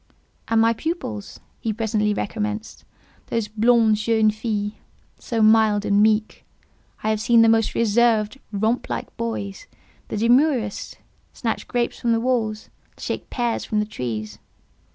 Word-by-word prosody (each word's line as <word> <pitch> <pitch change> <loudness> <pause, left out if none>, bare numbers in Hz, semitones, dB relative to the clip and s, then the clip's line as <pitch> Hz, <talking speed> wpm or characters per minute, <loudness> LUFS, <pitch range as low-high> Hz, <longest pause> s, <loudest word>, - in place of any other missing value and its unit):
"And 225 0 +2
my 225 +1 +4
pupils," 230 - -5 0.2
he 225 - -2
presently 215 -1 0
recommenced, 210 +1 -4 0.4
"those 230 -2 -1
blondes 220 0 +3
jeunes 220 -1 +2
filles—so 215 +1 -4
mild 215 -1 +4
and 200 0 +3
meek—I 215 0 -2
have 215 -1 -1
seen 235 -1 +5
the - - +5
most 225 -1 +2
reserved—romp 225 0 +1
like 120 -1 -5
boys, 105 -4 -4 0.4
the - - -4
demurest—snatch 240 -1 -1
grapes 240 -1 -1
from 235 -1 +1
the 230 - +2
walls, 225 -3 -1 0.3
shake - - -5
pears 240 -2 -1
from 215 - -2
the 210 - 0
trees. 110 - -5
220 Hz, 125 wpm, -22 LUFS, 210-230 Hz, 0.4 s, seen